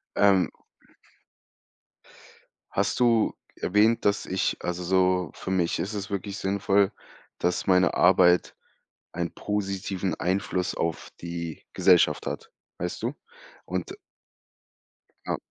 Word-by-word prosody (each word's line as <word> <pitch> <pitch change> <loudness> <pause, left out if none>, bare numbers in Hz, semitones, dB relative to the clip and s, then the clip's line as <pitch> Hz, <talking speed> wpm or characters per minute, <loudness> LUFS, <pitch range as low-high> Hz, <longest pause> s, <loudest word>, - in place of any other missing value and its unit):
Ähm 100 -3 +4 2.2
hast - - 0
du 115 -3 +3 0.2
erwähnt, 105 +4 +2
dass 100 0 +2
ich 95 0 -1
also 90 0 -3
so 90 0 +2
für 95 - -6
mich 90 -3 +1
ist 100 - -3
es 100 -1 -4
wirklich 100 0 -4
sinnvoll, 100 +1 +2 0.5
dass 90 +1 0
meine 90 -2 +4
Arbeit 90 -1 +4 0.6
einen 85 -1 -3
positiven 95 -3 -2
Einfluss 90 0 -1
auf 85 -1 -3
die 85 -1 -6
Gesellschaft - - +4
hat, - - -5 0.3
weißt 90 - -4
du? 120 +5 -2 0.5
Und - - -4 1.3
Ja. - - -1
95 Hz, 110 wpm, -26 LUFS, 90-100 Hz, 2.2 s, Ähm